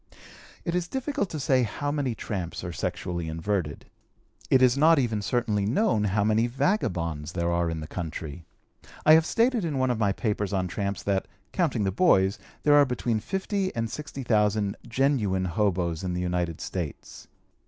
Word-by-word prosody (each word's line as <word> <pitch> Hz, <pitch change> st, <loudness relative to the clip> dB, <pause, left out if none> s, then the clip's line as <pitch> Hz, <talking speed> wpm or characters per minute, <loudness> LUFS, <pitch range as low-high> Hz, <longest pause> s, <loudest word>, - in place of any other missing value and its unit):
It 170 Hz, -, -1 dB
is 175 Hz, -1 st, 0 dB
difficult 265 Hz, -3 st, -2 dB
to 155 Hz, -, -4 dB
say 130 Hz, -2 st, +3 dB
how 125 Hz, +6 st, -2 dB
many 140 Hz, -5 st, -1 dB
tramps 95 Hz, -7 st, -4 dB
are 90 Hz, -1 st, -5 dB
sexually 85 Hz, -1 st, -3 dB
inverted. 80 Hz, -1 st, -2 dB, 0.6 s
It 130 Hz, -1 st, +5 dB
is 125 Hz, -1 st, +5 dB
not 160 Hz, +3 st, +5 dB
even 115 Hz, -6 st, 0 dB
certainly 105 Hz, 0 st, 0 dB
known 120 Hz, -, +2 dB
how 105 Hz, +1 st, +1 dB
many 110 Hz, +2 st, +2 dB
vagabonds 90 Hz, -, -1 dB
there 85 Hz, -1 st, 0 dB
are 85 Hz, 0 st, +1 dB
in 80 Hz, -1 st, -4 dB
the 75 Hz, -, -6 dB
country. 80 Hz, -1 st, -6 dB, 0.6 s
I 155 Hz, -, +8 dB
have 160 Hz, +1 st, +5 dB
stated 235 Hz, -2 st, +2 dB
in 155 Hz, -5 st, -1 dB
one 130 Hz, -1 st, +2 dB
of 115 Hz, -, -2 dB
my 100 Hz, -3 st, +2 dB
papers 105 Hz, -1 st, -2 dB
on 95 Hz, -1 st, 0 dB
tramps 100 Hz, +1 st, -3 dB
that, 100 Hz, -1 st, 0 dB, 0.2 s
counting 145 Hz, -, 0 dB
the 95 Hz, -, +1 dB
boys, 95 Hz, -, +3 dB, 0.2 s
there 150 Hz, -, +5 dB
are 145 Hz, 0 st, +8 dB
between 120 Hz, -2 st, -1 dB
fifty 190 Hz, -, -2 dB
and 115 Hz, -1 st, -2 dB
sixty 145 Hz, -3 st, -6 dB
thousand 105 Hz, -3 st, +2 dB
genuine 110 Hz, -7 st, +1 dB
hoboes 90 Hz, -2 st, 0 dB
in 90 Hz, -1 st, -2 dB
the 90 Hz, -, -2 dB
United 90 Hz, -2 st, -2 dB
States. 85 Hz, -6 st, -6 dB
105 Hz, 175 wpm, -27 LUFS, 90-140 Hz, 0.6 s, I